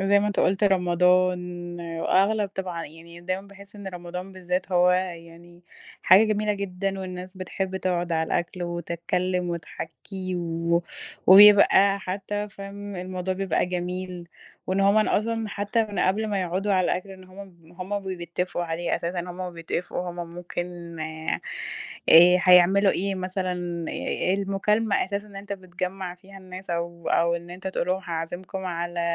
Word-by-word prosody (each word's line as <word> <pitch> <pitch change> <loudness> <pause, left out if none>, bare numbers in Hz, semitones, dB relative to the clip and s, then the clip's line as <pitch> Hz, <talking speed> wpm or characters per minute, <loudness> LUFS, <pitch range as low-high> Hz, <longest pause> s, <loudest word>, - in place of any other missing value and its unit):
زي 200 +1 +4
ما 205 - +1
أنت 205 - 0
قُلت، 195 +3 +2
رمضان، 180 -1 +2 0.2
وأغلب 205 +3 +2
طبعًا 180 -3 -4
يعني 165 +2 -13
دايمًا 185 +3 -4
باحِس 200 +1 -14
إن 200 -1 -9
رمضان 180 +1 -7
بالذات، 185 0 -3
هو 180 0 +5
يعني 175 -1 -4 0.4
حاجة 190 +5 +7
جميلة 210 0 0
جدًا، 195 -1 -3
والناس 185 0 -7
بتحِب 190 +1 -3
تقعد 175 -2 -1
على 160 0 +1
الأكل 175 +2 -2
وتتكلَّم 175 +1 -2
وتحكي 180 +3 -6
و 170 0 0 0.4
وبيبقى 200 0 +8
حتى 205 +2 -3
فاهم، 200 0 -8
الموضوع 185 +1 -3
بيبقى 190 -2 0
جميل، 180 0 -4 0.4
وإن 190 +1 0
هُم 200 +2 +4
أصلًا، 225 0 0
حتى 205 +3 0
من 210 -1 -6
قبل 210 +4 +2
ما 200 -2 0
يقعدوا 185 +3 -1
على 185 -1 +3
الأكل، 185 +3 -1
إن 190 -1 -11
هُم 185 0 -17 0.3
من 160 - -19
وهُم 185 +3 -3 0.2
بيتَّفقوا 175 +1 -3
عليه 170 +1 -2
أساسًا. 175 +1 -3
وهُم 180 +1 -6
بيتَّفقوا، 175 +1 -3
هُم 175 - -10
ممكن 175 -1 -6
آآ، 160 0 -3 1.1
هيعملوا 185 +2 +6
إيه 195 +1 -1
مثلًا، 185 0 -2 0.8
المكالمة 200 +2 +1
أساسًا 200 +1 -4
اللي 200 -1 -10
أنت 200 0 -7
بتجمِّع 185 -1 -5
فيها 195 +2 -14
الناس، 185 0 -9
أو 170 0 -3
أو 170 0 +3
إن 170 0 -10
أنت 180 +2 -8
تقول 190 - -2
لهم: 185 +1 0
"هاعزِّمكم 175 +3 -4
على 175 -1 -3
185 Hz, 150 wpm, -25 LUFS, 175-195 Hz, 1.1 s, وبيبقى